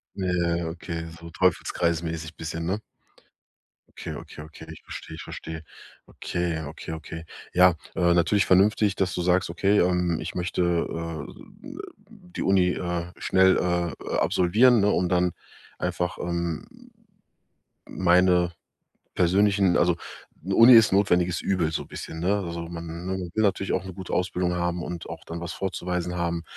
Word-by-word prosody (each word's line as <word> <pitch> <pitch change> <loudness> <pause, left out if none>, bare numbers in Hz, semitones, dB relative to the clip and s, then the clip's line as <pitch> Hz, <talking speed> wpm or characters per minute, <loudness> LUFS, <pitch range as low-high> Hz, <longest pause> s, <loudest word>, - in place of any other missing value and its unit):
Ja, 95 - -3
ja, 85 -1 +1
ja, 85 -1 -2
okay, 85 0 -6
so 85 0 -10
teufelskreismäßig 85 -2 -1
bisschen, 80 +1 -5
ne? 95 +5 -1 1.2
Okay, - - -5
okay, 75 - -10
okay. 80 0 -12
Ich - - -12
verstehe, 80 - -8
ich 80 - -8
verstehe. 80 -1 -7 0.4
Okay, 85 -2 -3
okay, 80 +2 -8
okay. 80 +1 -7 0.3
Ja, 90 +1 +7 0.2
äh, 85 -1 +3
natürlich 100 +4 +3
vernünftig, 100 +2 +4
dass 95 -1 0
du 90 - -2
sagst: 90 -1 +2
„Okay, 100 +4 +2
ähm, 90 -2 +1
ich - - -6
möchte, 90 0 -2
äh, 85 -2 -2 0.7
die 200 -5 -8
Uni, 95 -2 +3
äh, 85 -1 -3
schnell, 95 0 +4
äh, 85 -2 0
äh, - - -2
absolvieren, 110 +6 +4
ne, 105 - +3
und 90 0 +1
dann 90 -1 +2 0.5
einfach, 90 -1 -2
ähm, 85 -2 -3 1.2
meine 90 -1 +3 0.6
persönlichen” 95 +1 +3
also, 85 -1 +3 0.5
'ne 95 +1 -1
Uni 120 +2 +9
ist 110 -4 +6
notwendiges 90 -3 +2
Übel, 85 -5 0
so - - -2
bisschen, 80 - -7
ne? 100 +4 +2
Also, 85 0 -5
man 85 0 -7
man 95 0 -2
will 110 - +1
natürlich 95 -1 +1
auch - - 0
'ne 95 -1 -8
gute 95 -1 -7
Ausbildung 90 -1 0
haben 85 0 -1
und 85 -1 -6
auch - - -8
dann 85 +1 -6
was 85 - -5
vorzuweisen 90 -2 -3
haben. 85 -1 -2
90 Hz, 155 wpm, -25 LUFS, 85-95 Hz, 1.2 s, Uni